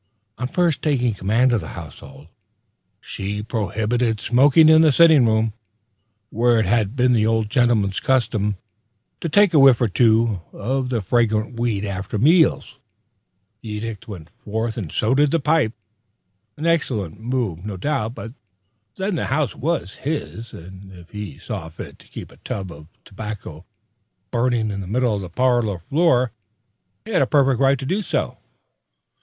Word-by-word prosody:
On 125 - -2
first 170 +1 0
taking 125 -6 +1
command 110 +6 +1
of 115 -4 +1
the 80 - -8
household, 70 -3 -11 0.7
she 105 +2 -5
prohibited 110 +2 -1
smoking 140 +7 +5
in 160 0 +7
the 155 -2 +5
sitting 155 -4 +6
room, 110 0 +1 0.8
where 120 0 +2
it 110 - +1
had 105 +2 0
been 125 -1 +3
the 110 -2 +2
old 110 -2 0
gentleman's 115 -6 +2
custom 110 -6 0 0.6
to 165 - -3
take 205 +3 +4
a 155 - +5
whiff 135 -3 +6
or 120 - +2
two 110 -2 +2
of 130 +4 -2
the 115 -5 -2
fragrant 115 +2 0
weed 110 -4 -1
after 95 +1 -4
meals. 150 - +2 0.8
The 110 - -9
edict 105 -1 -6
went 85 -7 -10
forth 110 +1 -3
and 95 -10 -5
so 110 +4 +1
did 145 +2 +3
the 165 - +1
pipe. 150 -6 +1 0.8
An 155 - -5
excellent 125 - -1
move, 115 -7 -3
no 105 -2 -5
doubt; 125 0 -2
but 115 - -8 0.6
then 195 +2 -2
the - - -2
house 140 0 -1
was 150 - -3
his, 135 -6 -5
and 95 +3 -12
if 90 -1 -15
he 105 -8 -7
saw 80 - -6
fit 80 - -10
to - - -19
keep - - -10
a - - -18
tub 95 -3 -6
of 75 -2 -13 0.2
tobacco 95 -5 -8 0.6
burning 120 -2 0
in 100 -1 -4
the 95 - -7
middle 120 +3 0
of 100 - -3
the 90 - -7
parlor 120 -1 +1
floor, 130 - +1 0.7
he 225 - -8
had 190 - +2
a 135 - +2
perfect 135 -4 +2
right 135 0 +3
to 135 - -7
do 190 +9 -1
so. 195 - -3
115 Hz, 165 wpm, -21 LUFS, 105-135 Hz, 0.8 s, in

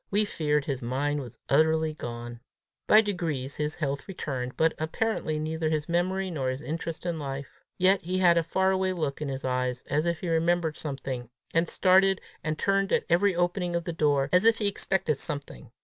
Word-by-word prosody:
We 210 +2 +2
feared 150 -6 0
his 135 -3 -3
mind 140 +5 -1
was 125 -4 -8
utterly 160 +2 +3
gone. 120 -4 -7 0.5
By 215 - +8
degrees 160 -10 -3
his 150 +1 -2
health 140 -3 -3
returned, 130 -9 -4
but 160 0 +3
apparently 160 0 -1
neither 155 +1 -1
his 155 -1 -1
memory, 185 +2 0
nor 135 -6 -1
his 130 +3 -4
interest 165 +2 -4
in 170 -2 -2
life. 135 -1 -6 0.2
Yet 190 +2 +4
he 180 +2 -2
had 175 -2 +5
a 170 - +4
far 190 +4 +1
away 190 0 +1
look 155 -5 -3
in 150 - -2
his 135 0 -4
eyes, 125 0 -1
as 150 +3 +1
if 170 -2 -1
he 180 - -3
remembered 165 -1 +1
something, 135 -5 -5 0.2
and 165 +1 +2
started 190 +2 +4 0.2
and 155 0 -2
turned 195 +2 +1
at - - +2
every 180 +2 +3
opening 175 0 0
of 170 - 0
the 170 - -4
door, 145 -3 +2
as 180 0 +4
if 230 0 +5
he 210 - -1
expected 190 -6 0
something. 145 -2 -5
160 Hz, 195 wpm, -27 LUFS, 140-180 Hz, 0.5 s, By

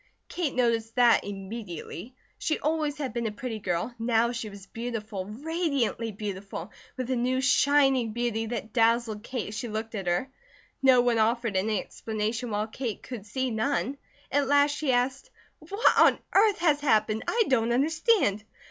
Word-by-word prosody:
Kate 345 -6 -2
noticed 230 -2 +1
that, 240 -1 +5
immediately. 200 +1 -7 0.2
She 310 - 0
always 305 -1 -1
had 275 -6 -4
been 235 -1 -1
a - - -2
pretty 230 -1 -5
girl, 180 +4 -2
now 230 0 +2
she 230 -3 -4
was 200 -1 -11
beautiful, 220 -3 -5
radiantly 275 - -1
beautiful, 200 -2 -6 0.3
with 255 0 -3
a - - +2
new 250 +2 +1
shining 270 -2 +3
beauty 225 -1 -1
that 220 -2 -5
dazzled 230 -2 +2
Kate 235 -2 -4
as 210 - -7
she 240 - -4
looked 220 +1 -4
at 195 -4 -4
her. 175 +10 0 0.5
No 260 -2 +6
one 240 -2 +2
offered 230 -1 +1
any 205 +2 +1
explanation 220 +4 -3
while 210 0 -1
Kate 225 0 -5
could 225 -5 -8
see 260 +3 -2
none. 275 +4 -1 0.3
At 285 -1 +2
last 285 +1 +4
she 295 -3 0
asked: 255 - 0 0.3
"What 395 +8 +2
on - - +6 0.2
earth 410 +1 +5
has 305 -4 +2
happened? 220 -6 +2
I 465 0 +3
don't 235 -3 +2
understand." 300 - +2
235 Hz, 165 wpm, -27 LUFS, 215-270 Hz, 0.5 s, No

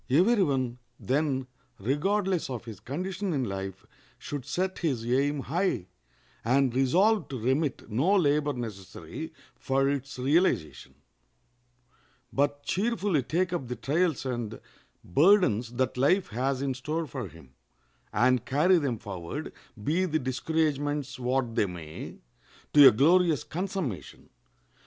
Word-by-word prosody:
Every 190 - +4
one, 130 -7 0 0.2
then, 135 -1 0 0.3
regardless 180 - 0
of 120 -4 -5
his 110 -5 -8
condition 185 - -3
in 135 -3 0
life, 95 -3 -5 0.3
should 145 -4 -6
set 185 +6 -2
his 135 -9 -1
aim 140 +4 +1
high, 140 - -1 0.5
and 130 +1 +2
resolve 185 - +3
to 135 - -5
remit 130 +5 -1
no 140 - +2
labor 150 -4 +2
necessary 110 -7 -7 0.2
for 135 +1 0
its 140 -1 -3
realization, 130 - +1 1.4
but 145 +1 0
cheerfully 200 - 0
take 180 +8 -1
up 160 -8 -2
the 125 - -4
trials 155 +5 0
and 120 -4 -3 0.4
burdens 125 - +3
that 130 +1 -1
life 175 +9 +3
has 130 +4 -1
in 135 -1 0
store 155 +6 -3
for 120 - -5
him, 80 -6 -16 0.6
and 125 +2 +3
carry 155 +8 +3
them 135 -6 -1
forward, 90 -5 -6 0.3
be 170 - +1
the 160 -3 0
discouragements 145 0 -1
what 125 -1 0
they 105 - +2
may, 85 -4 -8 0.6
to 145 -2 +10
a - - +9
glorious 165 +6 +4
consummation. 165 - -5
140 Hz, 130 wpm, -28 LUFS, 120-165 Hz, 1.4 s, to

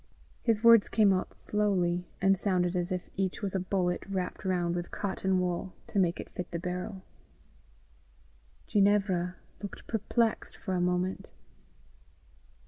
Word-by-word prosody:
His 225 -2 +1
words 230 -2 +7
came 210 -3 +5
out 185 - -1
slowly, 180 -4 0
and 195 +1 +4
sounded 185 -2 +1
as 175 +1 -1
if 180 -1 -2
each 190 +1 -1
was 195 - -2
a 190 - +1
bullet 180 -1 0
wrapped 185 -2 -3
round 175 -3 0
with 175 0 -3
cotton 190 -1 -1
wool 180 0 -2
to 200 - -1
make 175 -2 +2
it - - -7
fit 180 - -5
the 170 - -3
barrel. 180 +2 -4 1.6
Ginevra 195 -3 +2 0.3
looked 200 - -7
perplexed 225 +1 0
for 190 - -4
a 180 - +1
moment. 180 +1 -1
185 Hz, 140 wpm, -30 LUFS, 180-200 Hz, 1.6 s, words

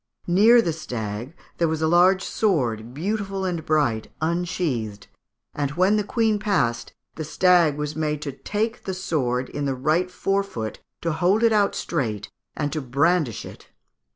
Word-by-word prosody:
Near 220 +7 +6
the 165 - -1
stag 120 -2 -5 0.2
there 170 - +3
was 160 0 -1
a - - +3
large 180 +3 +4
sword, 120 - 0
beautiful 195 - -2
and 175 -3 -2
bright, 140 -9 +1
unsheathed; 160 - -2 0.5
and 145 -1 -1
when 185 +5 +3
the 210 - +1
Queen 220 0 +1
passed, 145 - 0 0.2
the 160 - -5
stag 160 0 +3
was 150 0 -3
made 150 -1 -1
to 140 - -3
take 215 - -3
the 190 - -3
sword 130 -9 -1
in 145 -1 -3
the 135 -1 -1
right 155 +8 +1
fore 195 +2 0
foot, 115 - -6 0.2
to 165 - -1
hold 180 +8 +2
it 230 -1 +5
out 205 -2 +2
straight, 110 - -3 0.3
and 145 -1 -1
to 155 - -2
brandish 140 - +1
it. - - -12
160 Hz, 165 wpm, -24 LUFS, 135-190 Hz, 0.5 s, Near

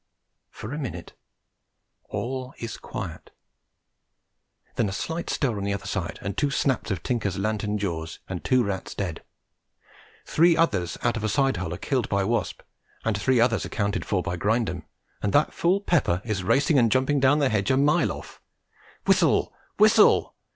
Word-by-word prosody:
For 110 +5 -8
a 150 - -4
minute 100 - -6 0.9
all 130 +1 -4
is 115 -2 -6
quiet; - - -7 1.5
then 110 - +1
a - - -4
slight 165 - -4
stir 130 -7 0
on 100 - -4
the 100 0 0
other - - -8
side 90 -4 -3
and 100 -1 -3
two 145 - +1
snaps 135 -4 0
of 95 -5 -3
Tinker's 105 -7 -1
lantern 105 +1 -1
jaws, 85 -5 -4
and 95 -2 -5
two 130 -1 +3
rats 100 -3 -4
dead; 90 -5 -4 1.0
three 170 +1 +4
others 100 - +1
out 120 -1 +1
of 110 - -4
a 110 - 0
side 135 +4 +2
hole 80 - -3
are 85 - -4
killed 130 +2 -1
by 100 -1 +1
Wasp, 115 +4 -1 0.4
and 115 -2 +1
three 125 +5 +2
others 115 -1 +2
accounted 100 -2 -2
for 90 -4 -1
by 90 - -3
Grindum, 110 +4 0 0.4
and 100 - -1
that 145 - +3
fool 185 +4 +1
Pepper 120 - +1
is 105 -5 -2
racing 140 - +3
and 115 -3 +3
jumping 130 +2 +2
down 135 +2 +4
the 140 -3 +2
hedge 105 0 0
a 130 - +3
mile 145 +2 +3
off. - - -10 0.6
Whistle! - - +3 0.2
whistle! - - +5
115 Hz, 170 wpm, -25 LUFS, 100-135 Hz, 1.5 s, whistle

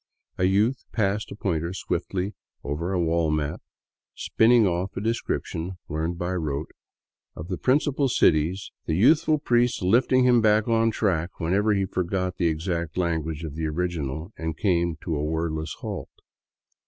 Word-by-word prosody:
A 90 - +3
youth 105 +7 +2
passed 105 -1 -1
a - - -6
pointer 85 -4 -2
swiftly 95 +1 -2 0.3
over 80 +6 -3
a 95 - 0
wall 85 -1 +1
map, 75 -1 -1 0.5
spinning 115 0 +4
off 90 +1 -1
a - - 0
description, 95 -5 -3
learned 80 +3 -2
by 90 +1 -2
rote, 75 -3 -3 0.6
of 80 +4 -8
the 90 - -2
principal 140 0 +2
cities, 85 -2 +2 0.2
the 80 - +1
youthful 155 - +4
priest 120 -6 +1
lifting 125 +6 +4
him 125 -2 +5
back 110 0 +3
on 115 -1 +3
the - - +2
track 90 -6 -1
whenever 100 +5 +2
he 100 -1 +1
forgot 90 0 -2
the 85 - +2
exact 85 0 -2
language 80 -3 -1
of 80 -3 -5
the 80 +1 -2
original 80 +1 -3
and 80 -1 -4
came 85 -4 +1
to 80 - -2
a 75 - -1
wordless 80 0 -2
halt. - - -5
90 Hz, 160 wpm, -25 LUFS, 80-105 Hz, 0.6 s, him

